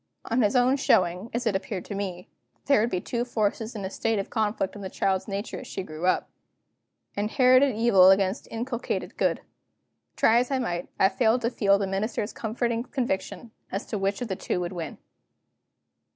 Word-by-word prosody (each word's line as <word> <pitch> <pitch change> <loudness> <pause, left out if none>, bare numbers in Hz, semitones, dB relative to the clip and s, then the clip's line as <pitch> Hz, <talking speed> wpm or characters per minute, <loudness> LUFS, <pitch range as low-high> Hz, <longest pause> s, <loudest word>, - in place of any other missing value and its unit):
On 235 +3 +1
his 210 +1 +2
own 250 +2 +4
showing 185 -4 +2
(as 240 +1 -2
it 215 -4 +1
appeared 190 -1 -3
to - - -6
me), 185 -3 -4 0.4
there 280 -6 +4
would 230 - +1
be 180 - -1
two 235 +6 -2
forces 225 -1 -2
in 200 -2 -4
a - - -3
state 225 +1 0
of 195 - -4
conflict 210 -3 -1
in 205 - -8
the 190 - -5
child's 190 +1 0
nature 200 +2 -4
as 255 - -10
she 190 - -5
grew 160 +1 -4
up 185 - +2 0.9
inherited 255 +4 +4
evil 205 -5 +6
against 195 +2 +2
inculcated 240 +1 -3
good. - - 0 0.7
Try 230 +1 +4
as 245 - -1
I 270 - +1
might, 175 -9 -2
I 190 - +6
failed 230 +3 +2
to 230 +1 0
feel 200 -4 +3
the 200 - -1
Minister's 205 +3 -2
comforting 230 +1 -2
conviction 235 -4 -3 0.2
as 195 - -3
to 210 - -4
which 195 +4 -1
of - - -4
the 190 - -2
two 180 - -2
would 175 +1 -3
win. 165 -3 -6
210 Hz, 195 wpm, -26 LUFS, 190-235 Hz, 0.9 s, evil